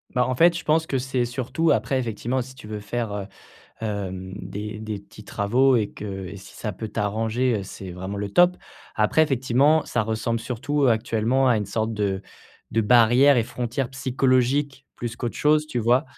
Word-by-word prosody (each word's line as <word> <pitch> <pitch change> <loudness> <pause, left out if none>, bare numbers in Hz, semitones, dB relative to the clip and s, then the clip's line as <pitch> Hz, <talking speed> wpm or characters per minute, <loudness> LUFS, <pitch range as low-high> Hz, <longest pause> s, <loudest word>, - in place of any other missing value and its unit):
Bah 125 0 +3
en 130 - -1
fait, 170 +2 +5
je 170 - -4
pense 160 +1 +2
que 135 - -1
c'est 130 -1 -1
surtout 130 +7 0
après, 135 - 0
effectivement, 120 +2 -2
si 130 +1 -7
tu 130 -5 -12
veux 105 -1 -4
faire, 110 +1 -3
heu, 100 -1 -4 0.5
hem, 95 -4 -4
des 105 +3 -6
des 110 -2 -4
petits 100 +1 -14
travaux 125 +8 +2
et 105 -3 0
que 95 -2 -6
et 90 - -8
si 95 - -13
ça 105 -3 -4
peut 110 +4 -6
t'arranger, 110 +3 0
heu, - - -6
c'est 95 -1 -8
vraiment 95 +3 -5
le 100 0 -3
top. 175 - +4 0.4
Après, 110 +9 +3
effectivement, 135 +2 +3
ça 120 - 0
ressemble 110 +1 -1
surtout 135 +4 -1
actuellement 115 +3 +2
à 120 - +4
une 105 - -1
sorte 110 +3 -2
de 100 -2 -1 0.5
de 115 - +3
barrière 120 +5 +5
et 115 - +2
frontière 125 +1 -3
psychologique 135 +1 +1
plus 120 -1 -4
qu'autre 120 -1 -4
chose, 150 +1 +3
tu 125 - -2
vois? 120 +5 +3
120 Hz, 195 wpm, -24 LUFS, 105-130 Hz, 0.5 s, fait